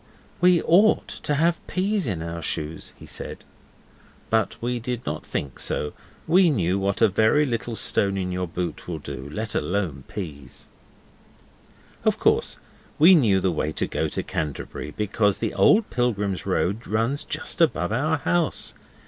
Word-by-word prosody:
'We 180 -1 +4
OUGHT 200 +6 +4
to 150 - 0
have 165 +3 +2
peas 195 -1 0
in 90 -7 -2
our 85 0 -5
shoes,' 80 +1 -2
he - - -12
said. - - -6 0.9
But 110 -1 +1
we 120 +1 -2
did 120 +1 -4
not - - -3
think 70 -4 -4
so. 75 - -1 0.3
We 180 +2 +5
knew 95 - +1
what 100 +3 0
a - - +8
very 110 +9 +3
little 115 -2 -3
stone 100 -1 +2
in 90 -1 -2
your 90 0 -2
boot 85 0 -5
will 85 -2 -3
do, 70 -2 -7
let 110 +8 -4
alone 85 -8 -2
peas. 75 -9 -7 1.4
Of - - +2
course - - +2 0.4
we 170 +5 +8
knew 110 - +4
the 95 0 +1
way 75 -1 -1
to - - 0
go - - -1
to - - -3
Canterbury, 75 -1 -4
because 105 -1 +1
the - - -2
old 215 +1 +4
Pilgrims' 105 -6 -1
Road 100 +6 0
runs 115 +6 0
just - - -2
above 90 +4 +2
our 150 +7 +1
house. 170 +1 0
105 Hz, 160 wpm, -24 LUFS, 90-145 Hz, 1.4 s, a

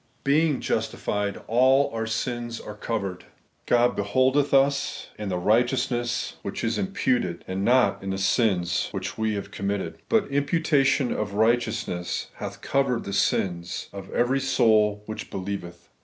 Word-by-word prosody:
Being 150 0 +2
justified, 105 -1 -2
all 130 +4 +4
our 115 0 -2
sins 120 +1 -3
are 105 - -8
covered 105 -4 -4 0.4
God 120 0 +3
behuldetli 130 +8 +2
us 140 0 -4
in 105 -2 -3
the 90 - -1
righteousness 120 +4 +1
which - - -5
is 115 0 0
imputed, 215 +5 -1
and 95 +1 -2
not 125 +3 +3
in 95 - -5
the 95 - -1
sins 95 -2 +1
which - - -4
we 110 -1 0
have 100 - -5
committed. 100 0 -3
But 220 -3 +3
imputation 145 -2 +2
of 100 -1 -3
righteousness 110 -5 0
hath - - -6
covered 135 -3 0
the 100 - -5
sins 85 -3 -1
of 95 -1 -8
every 130 +3 +2
soul 110 -6 +3
which 110 0 -6
believeth. 95 -2 -6
115 Hz, 140 wpm, -25 LUFS, 100-135 Hz, 0.4 s, all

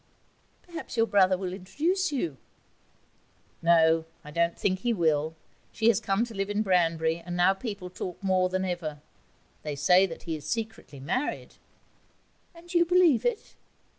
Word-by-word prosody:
'Perhaps 335 -8 -8
your 225 - +4
brother 190 -4 +3
will 185 -1 -4
introduce 325 - -1
you.' 170 - -2 1.2
'No, 165 -1 +4 0.2
I 150 - -10
don't 170 +2 0
think 185 -1 0
he 240 +3 0
will. 160 -4 +1 0.4
She 225 0 +2
has 220 -3 +3
come 215 +1 0
to 235 - -11
live 195 -1 -2
at 205 +1 0
Branbury, 165 -3 +1
and 175 +1 -5
now 180 +2 +5
people 195 -3 -6
talk 180 -1 -6
more 185 -1 +2
then 185 +1 -1
ever. 170 -5 -4 0.6
They 150 -2 -4
say 180 +7 +4
that 165 - -9
he 165 - -3
is 150 - -9
secretly 220 - -5
married.' 190 - -3 1.0
'And 345 +1 -12
you 345 -1 +5
believe 345 - +4
it?' 470 -3 -4
185 Hz, 160 wpm, -27 LUFS, 165-230 Hz, 1.2 s, now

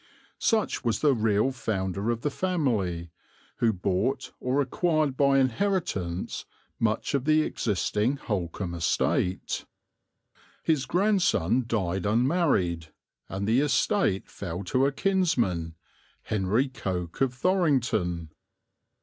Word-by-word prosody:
Such 225 -2 +1
was 115 -3 0
the 145 -2 +4
real 110 +1 +2
founder 100 -4 -2
of 115 -1 -1
the 145 - -1
family, 110 - -1 0.5
who 115 - +3
bought, 95 +5 -1
or 130 +3 0
acquired 155 0 +1
by 140 0 +4
inheritance, 130 - -1 0.3
much 115 +3 0
of 140 -2 0
the 155 0 +4
existing 105 - 0
Holkham 90 -5 -3
estate. 85 +2 0 1.0
His 155 -5 +1
grandson 175 - +2
died 95 -4 -1
unmarried, 110 - +1 0.4
and 100 +1 -3
the 115 +4 +4
estate 145 - +1
fell 90 0 -6
to 130 +9 +2
a - - 0
kinsman, 135 - 0 0.5
Henry 105 +6 +1
Coke, 90 -8 -4
of 130 -2 +2
Thorington. 125 - +1
115 Hz, 110 wpm, -27 LUFS, 95-145 Hz, 1.0 s, the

